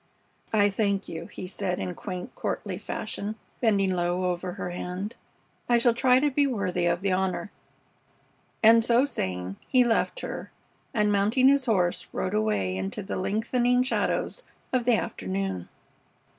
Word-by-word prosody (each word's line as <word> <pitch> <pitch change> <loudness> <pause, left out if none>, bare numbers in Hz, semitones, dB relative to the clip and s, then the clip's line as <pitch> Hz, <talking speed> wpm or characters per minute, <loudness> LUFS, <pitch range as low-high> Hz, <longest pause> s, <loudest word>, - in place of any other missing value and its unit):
"I 205 -2 +4
thank 200 -1 0
you," 165 +1 -6
he - - -8
said 180 -1 -2
in 180 - -3
quaint, 185 -4 -6
courtly 190 -3 -3
fashion, 215 0 -4 0.2
bending 200 -5 +2
low 180 +1 0
over 180 +1 -4
her 180 -2 -5
hand. 180 +4 -4 0.5
"I 240 - +5
shall 235 0 +4
try 250 +2 +4
to 295 +1 +2
be 285 +1 +3
worthy 185 -8 0
of 170 +1 +1
the 195 0 +1
honor." 190 +2 -1 1.1
And 225 +1 +7
so 240 +3 +4
saying, 95 - -3
he 255 -1 +5
left 240 - +1
her - - -5 0.4
and, 210 -1 +2
mounting 215 +7 +4
his 280 -1 +3
horse, 180 -6 +1
rode 185 - -2
away 210 - +1
into 95 - -3
the 195 - -4
lengthening 240 +6 +1
shadows 270 - 0 0.3
of 250 -2 +1
the 245 -2 +5
afternoon. 95 - -3
200 Hz, 155 wpm, -27 LUFS, 180-235 Hz, 1.1 s, And